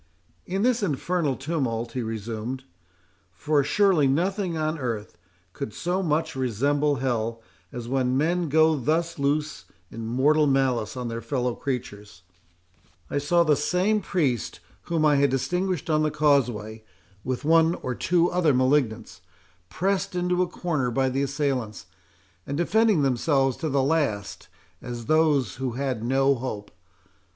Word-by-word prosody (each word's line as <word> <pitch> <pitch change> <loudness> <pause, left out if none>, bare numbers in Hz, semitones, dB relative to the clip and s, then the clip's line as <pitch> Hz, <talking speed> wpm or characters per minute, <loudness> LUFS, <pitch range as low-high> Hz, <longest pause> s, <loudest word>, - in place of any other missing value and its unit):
"In 190 +3 -1
this 245 -1 +2
infernal 165 -3 0
tumult," 130 -6 -2
he 125 - -3
resumed,—"for 110 - -4
surely 175 -1 +3
nothing 180 +4 0
on 155 0 -1
earth 115 -7 -4 0.4
could 105 - -6
so 180 +2 -1
much 160 -2 -1
resemble 140 +4 +1
hell, 115 -3 -2 0.3
as 120 -1 -6
when 130 0 0
men 170 +3 0
go 160 +2 +4
thus 160 +4 -1
loose 150 +2 -1 0.3
in 115 -1 -6
mortal 145 +6 +3
malice 130 -5 +1
on 125 -1 -3
their 115 0 -4
fellow 125 +1 -1
creatures,—I 90 - -8
saw 170 +4 +3
the 155 -3 +3
same 185 +8 +1
priest 140 - -1 0.3
whom 165 -2 +1
I 150 -1 +4
had 140 0 +3
distinguished 180 +6 -1
on 155 -1 +2
the 155 - +2
causeway, 125 -8 +1 0.4
with 130 +1 -3
one 165 +1 +4
or 125 - -4
two 170 +6 +2
other 165 -6 +2
malignants, 130 -3 0 0.5
pressed 195 +1 -1
into 180 0 +1
a 180 - +1
corner 155 -9 -2
by 130 +2 +1
the 135 +2 -1
assailants, 135 -6 -2 0.6
and 140 - -3
defending 205 0 +3
themselves 135 0 +1
to 160 - -3
the 135 -1 +1
last, 135 - -1 0.3
as 120 -2 -6
those 150 -9 +2
who 130 -2 -3
had 130 -3 -3
no 135 +3 +3
hope. 115 -5 -5
140 Hz, 140 wpm, -25 LUFS, 120-160 Hz, 0.6 s, go